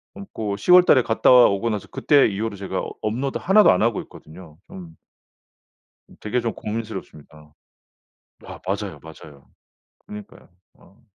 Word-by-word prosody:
어 200 - -9
그 105 -3 -4
10 180 - -1
월 180 0 +8
달에 130 -7 +4
갔다 115 - +1
오고 115 -3 +4
나서 105 -3 -5
그때 145 -2 +3
이후로 105 +1 -4
제가 100 0 -5
어 - - -7
업로드 125 +6 -3
1 205 +3 +4
도 - - +6
안 90 - +1
하고 115 -1 0
있거든요. 80 -1 -15
좀 85 -3 -12 1.1
음 - - -19
되게 120 +4 -2
좀 115 -1 -3
고민스럽습니다. 95 -9 -9 0.9
아 - - -11
맞아요, 100 -5 -4
맞아요. 75 -3 -15 0.6
그니까요. 105 -1 -12 0.2
어. 100 +6 -24
105 Hz, 290 characters per minute, -21 LUFS, 90-115 Hz, 1.1 s, 월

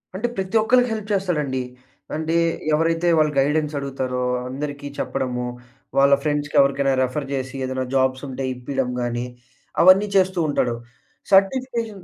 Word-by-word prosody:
అంటే 220 +5 -1
ప్రతి 190 +3 -3
ఒక్కళ్ళకి 245 +2 +3
హెల్ప్ 215 -1 -5
చేస్తాడండి. 150 -9 -1 0.5
అంటే 160 +1 -2 0.4
ఎవరైతే 165 +2 +1
వాళ్ళ 155 0 +3
గైడెన్సడుగుతారో 140 -3 -1 0.3
అందరికి 145 +1 -5
చెప్పడము, 125 -2 -2 0.5
వాళ్ళ 140 0 +6
ఫ్రెండ్స్‌కి 145 -1 -2
ఎవరికైనా 140 0 +2
రిఫర్ 135 +2 -3
జేసి, 130 0 -3
ఏదైనా 130 0 -2
జాబ్సుంటే 130 0 0
ఇప్పియడం 125 0 -3
గాని, 120 0 -2 0.6
అవన్నీ 195 +3 +6
చేస్తూ 185 -1 +2
ఉంటాడు. 120 -4 0 0.6
సర్టిఫికేషన్ 225 0 +1
145 Hz, 120 wpm, -22 LUFS, 130-185 Hz, 0.6 s, వాళ్ళ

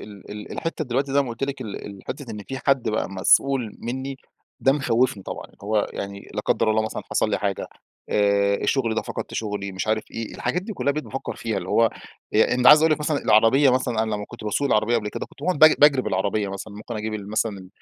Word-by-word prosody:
ال 100 -2 -12
ال 105 0 -7
الحتة 165 -2 -3
دلوقتي 135 +2 -1
زي 140 0 +4
ما 130 - -6
قُلت 115 +3 -7
لِك 140 -1 -5
ال 110 -5 -6
الحتة 115 +6 -7
إن 105 -1 -6
في 135 0 -4
حد 135 -4 +3
بقى 110 - -1
مسؤول 115 +4 +2
مني 130 +3 -4 0.4
ده 135 - +4
مخوفني 125 -7 +1
طبعًا، - - -6 0.2
هو 105 0 +1
يعني- 100 0 -6
لا - - -1
قدر 110 - +1
الله- 110 0 +2
مثلًا - - -4
حصل 110 - +1
لي - - +1
حاجة، 100 -2 -2 0.4
آآ، 100 -1 +3
الشغل 115 +2 0
ده - - -1
فقدت - - -6
شغلي، 105 -3 -3
مش 95 - -4
عارف 110 0 0
إيه، 115 -1 -6
الحاجات 180 - -1
دي 215 - -6
كلها 140 -7 0
بقيت 155 +1 -4
بافكر 135 - -5
فيها. 110 -3 -2
اللي 90 0 -7
هو، 115 -1 +4 0.4
إن 125 +3 +3
عايز 150 0 +10
أقول 160 -1 +5
لِك 150 - -1
مثلًا 150 -1 0
العربية 120 +6 +5
مثلًا 125 -3 +1
أنا 110 - -2
لما 105 0 -4
كنت 120 -2 -10
باسوق 125 +7 0
العربية 110 +3 +2
قبل 105 -2 -2
كده - - -5
كنت - - -20
باقعد 185 -5 0
بج 155 0 +9
باجري 145 -3 +6
العربية 100 +2 0
مثلًا، 100 +1 -7
ممكن 110 +2 -7
أجيب 110 0 -3
ال 105 -1 -6
مثلًا 100 -4 -2
110 Hz, 230 wpm, -24 LUFS, 105-135 Hz, 0.4 s, عايز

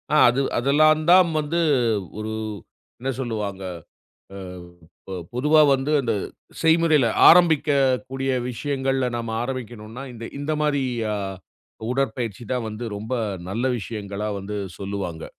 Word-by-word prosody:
ஆ - - +5
அது 125 +3 +1 0.2
அதுல்லாந்தாம் 155 +6 +5
வந்து 155 +3 -1 0.6
ஒரு 110 0 -4 0.7
என்ன 130 +2 -3
சொல்லுவாங்க. 105 -6 -3 0.7
அ - - -8 0.7
பொ 95 - -6 0.2
பொதுவா 150 +5 +4
வந்து 135 +3 -1
அந்த 115 -2 0 0.5
செய்முறையில 160 -5 +4 0.2
ஆரம்பிக்கக்கூடிய 140 -5 +3 0.2
விஷயங்கள்ல 135 0 -1
நம்ம 115 -1 -3
ஆரம்பிக்கணும்னா. 120 -1 -6
இந்த 115 -1 -9
இந்த 145 +2 -2
மாரி 145 -2 +1 1.1
உடற்பயிற்சி 120 -4 -2
தான் 125 -3 -1
வந்து 110 +3 -6
ரொம்ப 110 +5 -4 0.4
நல்ல 115 +6 -2
விஷயங்களா 105 -1 -5
வந்து 100 +2 -5 0.2
சொல்லுவாங்க. 95 -5 -4
130 Hz, 110 wpm, -23 LUFS, 110-145 Hz, 1.1 s, ஆ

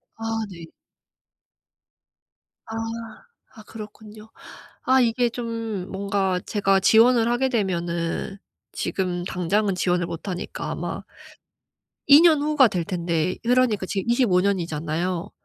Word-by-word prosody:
아 225 - -10 0.3
네. 170 -3 -10 2.0
아. 225 - -7 0.8
아 220 - -12
그렇군요. 215 0 -11 0.5
아 260 0 +4
이게 240 0 +2
좀 230 -5 -4
뭔가 195 -1 -1
제가 195 -2 +2
지원을 230 +4 +5
하게 260 +2 +1
되면은 175 -3 -2 0.4
지금 180 -2 -2
당장은 195 +3 0
지원을 180 -1 0
못 165 +3 -7
하니까 185 +2 -5
아마 - - -4 1.1
2년 305 +1 +7
후가 295 -4 +4
될 180 -4 -2
텐데 170 -1 -1
그러니까 235 -5 +2
지금 195 +4 -2
25 235 -7 +3
년 200 0 +1
이잖아요. 170 +3 -3
200 Hz, 215 characters per minute, -23 LUFS, 180-230 Hz, 2.0 s, 2년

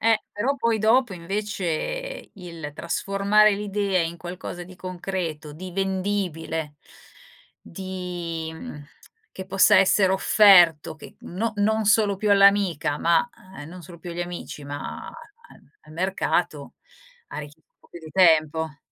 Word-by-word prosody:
Eh, 225 -1 +3
però 250 +7 0
poi 230 -3 +1
dopo 225 +1 +3
invece, 205 - -4
il 170 -6 -8
trasformare 200 +5 +2
l'idea 200 -2 -1
in 165 +1 -3
qualcosa 175 0 -7
di 180 +1 -13
concreto, 175 -5 -5
di 180 +3 -9
vendibile, 185 -5 -2 0.8
di, 175 -3 -6
mhmm, 160 - -9 0.5
che 190 - -8
possa 195 0 +5
essere 190 0 +4
offerto, 180 -6 +5
che 155 - -14
no 220 +5 -3
non 220 +1 +1
solo 205 -1 +3
più 210 +1 -1
all'amica, 200 -7 +4
ma 170 +6 +2 0.3
ehm, 145 - -9
non 180 +1 -11
solo 170 0 -12
più 175 +1 -8
agli 170 +1 -5
amici, 175 -4 -7
ma 145 0 -6
a - - -9 0.7
al 155 - -17
mercato 185 +3 -1 0.5
ha - - -7
rich 150 0 -9
un 160 - -35 0.2
po' - - -24
più 170 - -10
di 160 -1 -11
tempo. 160 -3 +3
185 Hz, 140 wpm, -24 LUFS, 165-200 Hz, 0.8 s, possa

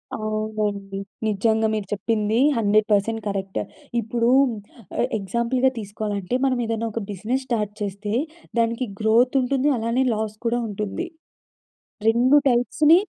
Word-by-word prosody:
అవునండి. 215 -2 -2 0.3
నిజంగా 220 +1 +2
మీరు 210 -3 -2
చెప్పింది 215 +1 0 0.2
100% 215 +1 +2
కరెక్ట్. 195 -1 -2 0.4
ఇప్పుడు 230 +1 0 0.7
ఎ - - +3 0.2
ఎగ్జాంపుల్‌గా 235 +6 +1
తీసుకోవాలంటే 205 0 -3
మనమేదన్నా 230 -3 0
ఒక 230 - -2
బిజినెస్ 225 +7 -2
స్టార్ట్ 210 -4 -1
చేస్తే 205 +1 -3 0.5
దానికి 230 +2 +1 0.2
గ్రోత్ 235 +4 +4
ఉంటుంది, 265 +2 +1
అలానే 230 +3 +1
లాస్ 215 0 -3
కూడా 240 +1 +1
ఉంటుంది. 210 - -3 1.0
2 245 +5 +5
టైప్స్‌ని 270 +6 +4
220 Hz, 110 wpm, -23 LUFS, 205-240 Hz, 1.0 s, 2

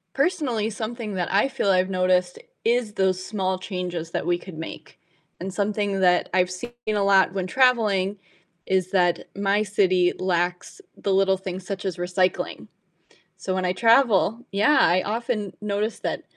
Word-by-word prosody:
Personally, 275 - 0
something 220 -1 -5
that 175 -2 -2
I 205 +8 +2
feel 265 -7 -1
I've 185 0 +3
noticed 185 -1 +1 0.2
is 230 -2 +1
those 190 -2 +1
small 190 -2 -2
changes 180 -4 -5
that - - -2
we 175 0 +1
could 175 -2 -11
make, 160 -1 -9 0.4
and 190 0 -5
something 205 -1 -1
that 180 -1 +3
I've 180 -1 +3
seen 185 +7 -7 0.2
a 210 -2 +1
lot 195 -2 +4
when 185 -1 -2
traveling 210 -6 +2 0.5
is 185 -1 0
that 175 -3 +2
my 200 +1 +1
city 185 -3 +2
lacks 180 - -2 0.2
the 200 - -1
little 190 0 +3
things 185 -1 -7
such 195 0 -4
as 190 -2 -3
recycling, 180 +1 -1 0.7
so 185 - -3
when 185 -1 -1
I 180 - 0
travel 230 0 +3
yeah, 210 +9 +3
I 180 +2 +4
oftern 220 -3 -2
notice 210 +1 -2
that - - -3
195 Hz, 160 wpm, -24 LUFS, 185-210 Hz, 0.7 s, lot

